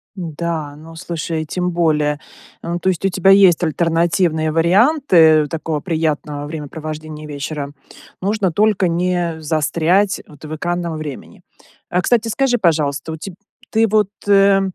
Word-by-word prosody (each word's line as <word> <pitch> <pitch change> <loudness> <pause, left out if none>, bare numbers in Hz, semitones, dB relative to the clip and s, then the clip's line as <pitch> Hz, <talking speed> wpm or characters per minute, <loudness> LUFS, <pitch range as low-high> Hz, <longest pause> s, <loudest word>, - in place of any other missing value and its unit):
Да, 165 -4 -4
ну, 160 +2 -13
слушай, 165 -2 -4
тем 180 +3 -2
более, 150 -3 +1 0.4
эм, 170 +1 -3
то 190 - +1
есть 185 +1 -2
у - - +3
тебя 190 +1 +2
есть 195 -3 +6
альтернативные 165 0 +1
варианты 170 - +4
такого 160 0 -3
приятного 150 -3 -2
времяпровождения 155 0 -7
вечера? 145 0 -5 0.5
Нужно 200 -1 0
только 205 0 +2
не 175 -1 -1
застрять, 165 +6 +1
вот, 150 -1 -17
в 155 +1 -5
экранном 175 0 -3
времени. 150 -4 -8 0.6
Кстати, 230 +3 +1
скажи, 245 +2 +1
пожалуйста, 155 - 0
у - - -4
теб 175 +2 -8 0.4
ты 225 0 +3
вот, 210 -1 +2 0.2
э, 195 -1 +5
165 Hz, 135 wpm, -18 LUFS, 155-190 Hz, 0.6 s, есть